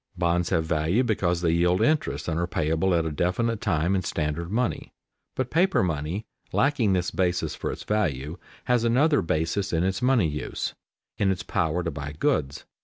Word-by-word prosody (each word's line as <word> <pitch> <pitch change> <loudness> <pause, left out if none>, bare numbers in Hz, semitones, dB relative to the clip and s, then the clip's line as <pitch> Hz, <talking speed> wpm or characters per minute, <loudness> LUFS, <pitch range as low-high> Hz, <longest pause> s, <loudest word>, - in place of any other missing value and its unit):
Bonds 85 0 +1
have 80 -3 +1
value 80 +9 +1
because 90 -7 0
they 85 -2 +2
yield 90 +2 +2
interest 155 0 +1
and 80 -1 -1
are 85 - 0
payable 80 +3 +1
at 85 -1 +1
a 80 - -2
definite 105 +9 0
time 90 -5 +1
in 95 - +1
standard 85 0 -2
money. 120 +2 -1 0.4
But 130 -1 -2
paper 180 - +3
money, 85 +5 -2 0.3
lacking 125 -8 +2
this 90 -1 0
basis 90 -1 0
for - - -3
its - - -7
value, 80 -6 -1 0.2
has 125 -2 +2
another 140 +6 +3
basis 85 +5 -1
in 85 0 +1
its 95 +3 -1
money 125 -8 +3
use, 75 -1 -4 0.5
in 100 - +3
its 95 -2 -1
power 80 +2 0
to 85 - -2
buy 70 0 -6
goods. 75 - -1
90 Hz, 180 wpm, -26 LUFS, 80-110 Hz, 0.5 s, paper